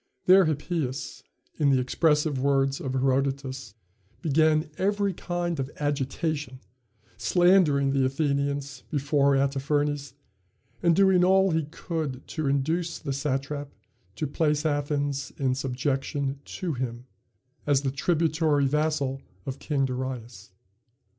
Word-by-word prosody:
There 190 0 +7
Hippias 150 -3 -3 0.4
in 145 -2 +4
the 135 -2 +4
expressive 150 +2 +1
words 135 0 +1
of 130 -2 -3
Herodotus 135 -3 -1 0.5
began 155 0 +3
every 200 0 +1
kind 175 -2 -3
of 135 0 -2
agitation, 145 -1 -2 0.6
slandering 150 - +4
the 135 -1 +2
Athenians 140 -1 -1
before 140 -1 +2
Artaphernes, 140 +1 0 0.7
and 170 -1 +4
doing 190 -1 +5
all 190 +1 +4
he 160 -1 0
could 150 -4 -5
to 155 -3 -2
induce 160 +5 0
the 140 - -4
satrap 140 +1 -2 0.5
to 155 - -2
place 150 +1 0
Athens 145 -2 -1
in 130 -2 +1
subjection 135 +1 -2
to 175 -4 -4
him, 125 -2 -4 0.6
as 140 -1 +3
the 135 - 0
tributary 155 -1 +1
vassal 145 -2 0 0.2
of 135 0 -5
King 140 -3 0
Darius. 125 -5 -5
140 Hz, 115 wpm, -26 LUFS, 135-155 Hz, 0.7 s, There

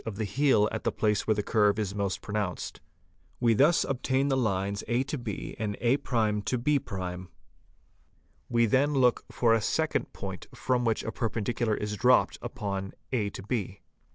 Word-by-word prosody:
of 110 -3 -5
the 110 - -2
heel 105 0 +3
at - - -4
the - - +1
place 105 -2 0
where 110 - +3
the 105 - -1
curve 105 -1 +3
is 105 -3 -2
most 100 -2 -2
pronounced. 100 -3 -3 0.6
We 115 -2 +4
thus 150 +9 +4
obtain 135 +1 0
the 135 - +2
lines 100 -4 0
a 120 +3 +1
b 135 -3 -5
and 105 -2 -2
a' 125 +3 +3
b'. 105 -5 -1 1.2
We 115 0 +3
then 135 +6 +2
look 125 -3 +3
for 115 -2 +2
a 115 - +3
second 105 - 0
fixed - - -37
point - - -7
from 125 -1 0
which 115 -1 +1
a 110 - -3
perpendicular 115 0 -1
is 105 0 -3
dropped 125 +4 +3
upon 100 -5 -4 0.2
a 110 -6 0 0.2
b. 100 -4 -3
110 Hz, 165 wpm, -28 LUFS, 100-125 Hz, 1.2 s, We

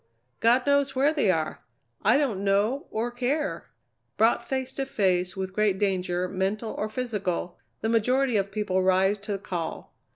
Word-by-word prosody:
God 240 +3 +4
knows 280 -1 +2
where 280 +4 +3
they 285 -10 +2
are! 160 -4 -1 0.4
I 220 +6 +4
don't 235 -10 0
know 205 +7 +1
or 230 +3 -2
care." 260 +5 -2 0.5
Brought 225 +2 +3
face 265 -1 -2
to 270 - -2
face 185 -5 0
with 190 0 -4
great 210 -2 +2
danger, 185 -2 0
mental 195 +4 -2
or 215 - -3
physical, 205 -7 -3 0.2
the 220 - 0
majority 250 +3 +2
of 200 -1 0
people 195 -3 0
rise 190 +2 +3
to 205 +1 -4
the - - -1
call. 175 -4 -5
210 Hz, 165 wpm, -26 LUFS, 190-250 Hz, 0.5 s, God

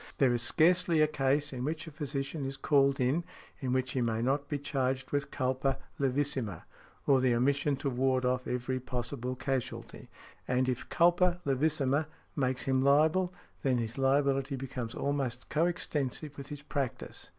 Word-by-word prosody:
There 130 -3 +4
is 120 - 0
scarcely 170 +5 +3
a 155 - +6
case 145 0 +1
in 125 -1 -4
which 155 +3 -2
a 160 - -9
physician 140 0 -4
is 135 0 -4
called 140 -1 +3
in, 135 +7 +2 0.4
in 130 -2 -2
which 130 0 0
he 130 - 0
may 115 -2 0
not 140 +3 0
be 145 - -1
charged 130 -2 -2
with 145 -1 -1
culpa 130 0 0 0.2
levissima, 135 - 0 0.4
or 135 -2 +5
the 125 -2 +3
omission 140 +3 +2
to 140 +1 -2
ward 130 0 +1
off 125 0 0
every 125 +1 -2
possible 125 0 -3
casualty; 130 -1 -4 0.4
and 130 +1 +1
if 125 -2 -2
culpa 175 +1 +3
levissima 145 +1 +1 0.3
makes 130 -3 0
him 130 -1 +2
liable, 155 +6 +4 0.3
then 130 -2 +2
his 115 +2 -3
liability 135 0 +2
becomes 125 -3 -5
almost 135 -4 -2
co 160 +3 +2
extensive 150 -4 -3
with 140 -1 -8
his 145 -1 -8
practice. 140 -4 -4
135 Hz, 165 wpm, -31 LUFS, 130-145 Hz, 0.4 s, a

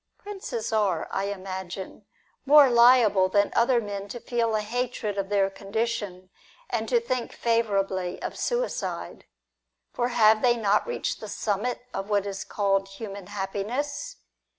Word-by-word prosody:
Princes 380 - -5
are, 200 -6 +1
I 195 - -1
imagine, 190 0 -6 0.4
more 285 -1 +7
liable 235 -6 +6
than 200 +1 +2
other 240 +1 +4
men 200 -2 -5
to 240 +4 -7
feel 230 -2 0
a 215 - +1
hatred 235 -1 -3
of 195 -1 -3
their 200 -1 +3
condition, 200 -2 -3 0.4
and - - -1
to 480 - +4
think 255 - -3
favourably 195 -6 0
of - - -5
suicide. - - -3 0.7
For 240 - 0
have 220 -3 +4
they 240 -1 +3
not 210 - +2
reached 485 - -2
the - - -7
summit 220 +4 -2
of 195 +1 -4
what 205 -1 +1
is 195 -1 -4
called 195 -1 0
human 195 -1 -8
happiness 240 - -3
210 Hz, 145 wpm, -26 LUFS, 195-240 Hz, 0.7 s, more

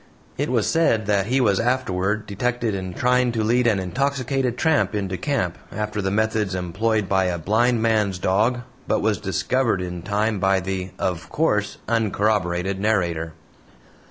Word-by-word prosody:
It - - -2
was - - +1
said 115 -10 +2
that 100 -1 +1
he 130 +3 +2
was 105 -6 +3
afterward 110 -4 0
detected 115 +2 -1
in 95 -2 -5
trying 125 0 +2
to 110 -2 0
lead 120 +2 +2
an 110 -3 +3
intoxicated 130 +4 -1
tramp 105 -11 +2
into 95 -2 -2
camp 95 - -2
after 105 0 -3
the 95 - -1
methods 110 -1 0
employed 100 +4 -1
by 95 0 +2
a 90 -1 -1
blind 110 +7 +1
man's 105 -4 +1
dog, 110 +7 +1 0.3
but - - +1
was 105 -1 +1
discovered 110 +2 0
in 90 -1 -5
time 105 +2 0
by 95 0 +3
the 95 0 -3
of 85 -2 -3
course 105 -10 0
uncorroborated 100 -4 0
narrator. 85 -6 0
105 Hz, 155 wpm, -23 LUFS, 95-115 Hz, 0.3 s, was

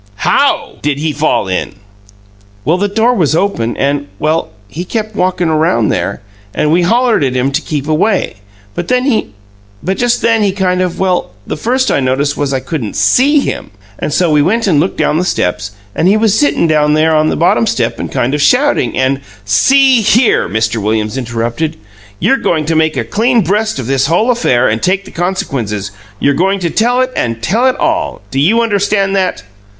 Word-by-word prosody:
"HOW - - +1
did 145 -1 -1
he 155 +1 -2
fall 150 -8 0
in?" 95 0 -3 0.9
"Well, 160 +6 +2
the 205 - +1
door 225 +4 +1
was 160 - +1
open, 165 - -1
and 140 +1 -1
well, 155 +2 -1 0.2
he 160 - -6
kept 215 +2 -4
walkin' 180 -2 0
around 155 -9 +1
there, - - -2 0.3
and 150 - +1
we 175 +2 +3
hollered 230 - +2
at 130 -2 -1
him 130 +2 0
to 140 - -1
keep 145 -2 -4
away, 160 - 0 0.4
but 175 - -4 1.1
just 245 -1 +1
then 230 -1 +3
he 200 -2 +1
kind 185 -2 0
of 180 -2 -2
well, 185 -2 0 0.2
the - - -4
first 255 +9 0
I - - +1
noticed 140 +2 0
was 145 -1 -2
I 135 - 0
couldn't 130 -6 -5
SEE 265 - +3
him, - - -4 0.3
and - - -3
so 170 +2 +1
we 150 -1 +4
went 225 +9 +1
and 165 -8 +2
looked 175 +6 -1
down 155 - +1
the - - 0
steps, 100 - -1 0.2
and 170 - +1
he 200 +3 +4
was 220 -2 +2
sitting 290 -8 +2
down 150 -2 +2
there 160 +1 +2
on 155 0 +2
the - - -1
bottom 120 -9 +2
step - - -1
and - - -5
kind 125 +3 -1
of 150 - 0
shouting, 255 - +2
and 130 +1 0 0.2
" 105 - -28
"See 260 - +4
here!" 225 - +2
Mr. 110 +2 -1
Williams 110 +2 -1
interrupted. 120 +5 -3 0.4
"You're 270 - +2
going 160 - -1
to 165 +1 -1
make 160 -2 +1
a 120 - 0
clean 230 - +1
breast 210 +3 0
of 130 - -4
this 135 +2 +1
whole 215 - +2
affair 130 - +1
and 110 +1 -1
take 190 +2 0
the - - -12
consequences. 120 - -3 0.3
You're 140 - +2
going 190 +6 +1
to 170 -2 -1
tell 245 +3 +2
it 255 0 -1
and 115 -1 -2
tell 230 +8 +2
it 255 - +2
ALL. 320 -1 -1
Do 135 - -1
you 210 +11 +3
understand 200 -2 0
that?" 185 - -1
160 Hz, 200 wpm, -13 LUFS, 135-210 Hz, 1.1 s, we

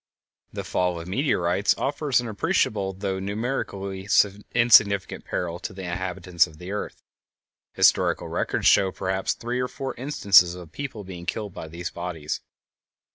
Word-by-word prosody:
The - - -5
fall 90 -2 -1
of 85 - -8
meteorites 95 - +1
offers 140 -1 0
an 120 - -3
appreciable, 100 -2 0
though 95 0 -3
numerically 100 -2 -4 0.4
insignificant, 110 -5 +4
peril 85 -1 -3
to - - -6
the 95 0 -8
inhabitants 90 -1 0
of 80 -2 -15
the 90 +4 -8
earth. 105 - -5 0.7
Historical - - +3
records - - -2
show 95 -1 +5
perhaps 95 0 -1
three 120 +2 -3
or 125 - 0
four 135 +1 -5
instances 100 -10 +4
of 90 -3 -11
people 130 -3 -6
being 90 -2 -9
killed 105 -2 -3
by 80 - -7
these 85 +2 -6
bodies. 85 -4 -4
95 Hz, 145 wpm, -25 LUFS, 90-110 Hz, 0.7 s, show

